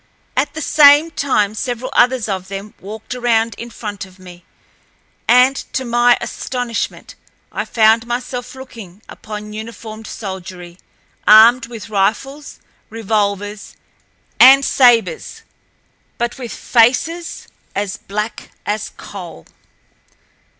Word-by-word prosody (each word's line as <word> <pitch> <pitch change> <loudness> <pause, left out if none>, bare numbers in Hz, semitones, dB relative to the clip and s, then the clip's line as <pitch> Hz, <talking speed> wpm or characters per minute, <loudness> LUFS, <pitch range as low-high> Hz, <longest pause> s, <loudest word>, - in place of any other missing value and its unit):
At 285 +3 -1
the 315 - -4
same 295 +2 +6
time 215 -9 0
several 245 +2 -4
others 245 -2 +3
of 190 -2 -4
them 195 +2 -7
walked 215 +4 -8
around 230 -2 +1
in 235 - -7
front 205 -3 -7
of 190 -1 -14
me, 180 -2 -14 0.8
and, 250 +2 +5 0.2
to 260 - -2
my 240 0 +3
astonishment, 245 -3 -4 0.4
I - - -3
found 225 0 +3
myself 245 +1 -5
looking 225 -7 -12
upon 210 0 -8
uniformed 220 0 -8
soldiery, 185 -3 -8 0.5
armed 230 +4 +7
with 230 -2 -9
rifles, 225 +9 -2 0.3
revolvers, 205 -2 -2 0.6
and 270 +1 +8
sabers, 245 - +2 0.7
but 240 -1 -2
with 245 -3 -6
faces 260 +9 +1 0.3
as 200 -1 -2
black 210 +2 -5 0.2
as 210 0 -2
coal. 175 - -10
225 Hz, 110 wpm, -17 LUFS, 205-250 Hz, 0.8 s, and